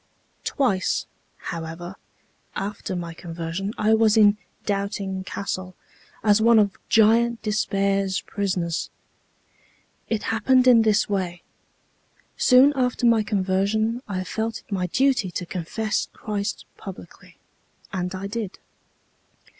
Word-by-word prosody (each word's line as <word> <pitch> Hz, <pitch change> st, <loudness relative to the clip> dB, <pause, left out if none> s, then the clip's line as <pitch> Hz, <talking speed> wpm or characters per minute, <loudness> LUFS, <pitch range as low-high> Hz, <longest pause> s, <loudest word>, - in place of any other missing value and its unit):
"Twice, 200 Hz, -9 st, 0 dB, 0.3 s
however, 165 Hz, +2 st, -6 dB, 0.6 s
after 195 Hz, -1 st, -4 dB
my 170 Hz, -2 st, -4 dB
conversion 170 Hz, +3 st, -5 dB
I 215 Hz, +1 st, +3 dB
was 220 Hz, -1 st, +4 dB
in 210 Hz, -1 st, +6 dB, 0.3 s
'Doubting 200 Hz, -1 st, -2 dB
Castle' 185 Hz, -1 st, -4 dB, 0.5 s
as 210 Hz, 0 st, +4 dB
one 230 Hz, +1 st, +6 dB
of 205 Hz, -2 st, +3 dB
Giant 230 Hz, +2 st, +4 dB
Despair's 195 Hz, -2 st, 0 dB
prisoners. 185 Hz, -5 st, -2 dB, 1.2 s
It 225 Hz, -2 st, -1 dB
happened 255 Hz, +3 st, +3 dB
in 240 Hz, -2 st, +7 dB
this 215 Hz, -1 st, +3 dB
way: 185 Hz, -4 st, -2 dB, 0.9 s
Soon 260 Hz, +3 st, +6 dB
after 250 Hz, -1 st, 0 dB
my 230 Hz, -2 st, +5 dB
conversion 210 Hz, +3 st, 0 dB
I 185 Hz, -2 st, -2 dB
felt 220 Hz, +4 st, -3 dB
it -, -, -30 dB
my 185 Hz, -2 st, 0 dB
duty 260 Hz, -1 st, +2 dB
to 180 Hz, +1 st, -4 dB
confess 190 Hz, +5 st, -2 dB
Christ 210 Hz, -1 st, -4 dB
publicly, 195 Hz, -3 st, -11 dB, 0.6 s
and 180 Hz, 0 st, -2 dB
I 190 Hz, +1 st, -5 dB
did. 210 Hz, -1 st, -4 dB
200 Hz, 115 wpm, -24 LUFS, 185-220 Hz, 1.2 s, in